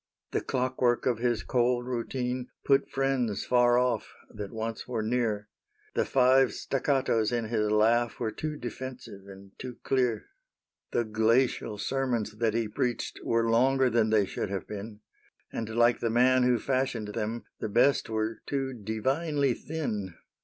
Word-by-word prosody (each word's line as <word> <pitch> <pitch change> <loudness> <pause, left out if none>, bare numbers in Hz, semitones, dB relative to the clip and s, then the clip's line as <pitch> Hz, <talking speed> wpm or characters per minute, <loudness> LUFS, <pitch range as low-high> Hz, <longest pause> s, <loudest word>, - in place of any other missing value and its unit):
> - - -58
The - - 0
clockwork 125 -1 0
of 120 -4 +1
his 120 -2 0
cold 120 -1 +1
routine 125 0 -3 0.2
Put 135 0 +3
friends 135 -6 0
far 120 -1 +4
ofF 125 0 0 0.2
that 105 -2 -6
once 110 0 -4
were 115 -3 -2
near; 110 -3 0 0.5
The - - +1
five 130 0 +4
staccatos 130 -5 +1
in 115 -2 -1
his 105 -2 +1
laugh 115 +2 +2
Were 115 -2 -1
too 155 +4 -4
defensive 120 -4 -7
and 95 0 -12
too 125 -1 -7
clear; 125 -5 +1 0.6
The 120 - +1
glacial 110 0 +1
sermons 120 -3 -1
that 115 -2 +1
he 115 -1 0
preached 120 +3 -2
Were 115 0 +1
longer 130 +3 +3
than 110 -1 +3
they 110 -2 +4
should 95 - -4
have 100 -2 -3
been; 105 +1 -8 0.5
And, 115 -1 -3
like 120 +1 +3
the 115 - 0
man 125 +3 +4
who 125 -1 +4
fashioned 130 -5 -1
them, 110 +2 -3 0.2
The - - -3
best 120 +6 +3
were 110 0 -2
too 135 -2 -2
divinely 130 +6 0
thin. 105 - -4
120 Hz, 155 wpm, -28 LUFS, 110-130 Hz, 0.6 s, far